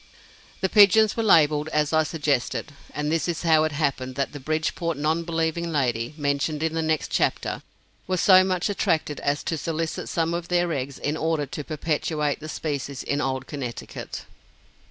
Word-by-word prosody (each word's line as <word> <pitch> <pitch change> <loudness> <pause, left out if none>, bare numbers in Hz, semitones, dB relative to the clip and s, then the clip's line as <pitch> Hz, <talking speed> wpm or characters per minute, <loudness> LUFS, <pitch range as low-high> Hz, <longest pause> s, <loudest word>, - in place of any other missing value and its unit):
The 190 - +2
pigeons 210 +2 +6
were 230 - 0
labeled 155 -7 +4
as 150 -1 0
I 160 - +5
suggested, 150 -3 -1 0.2
and 150 +1 -2
this 165 -1 0
is 170 -1 -2
how 160 -2 +4
it 155 - -1
happened 140 -3 -2
that 140 0 -1
the 145 - -8
Bridgeport 155 +2 -1
non 155 +3 +1
believing 165 0 -1
lady, 125 -3 -1
mentioned 145 +1 -1
in 160 0 0
the 165 - 0
next 160 -1 -1
chapter, - - 0 0.5
was 185 -1 0
so 185 0 +7
much 185 -1 0
attracted 160 -7 0
as 145 +1 -1
to 165 - -2
solicit 165 0 -3
some 165 0 0
of 170 0 -3
their 175 -1 +1
eggs 135 -1 -4
in 145 +2 -2
order 160 -2 0
to 150 +2 -6
perpetuate 150 -1 -1
the 155 - -8
species 140 -4 -4
in 145 +1 -1
old 130 -1 -2
Connecticut. 130 -6 -6
155 Hz, 175 wpm, -25 LUFS, 145-165 Hz, 0.5 s, so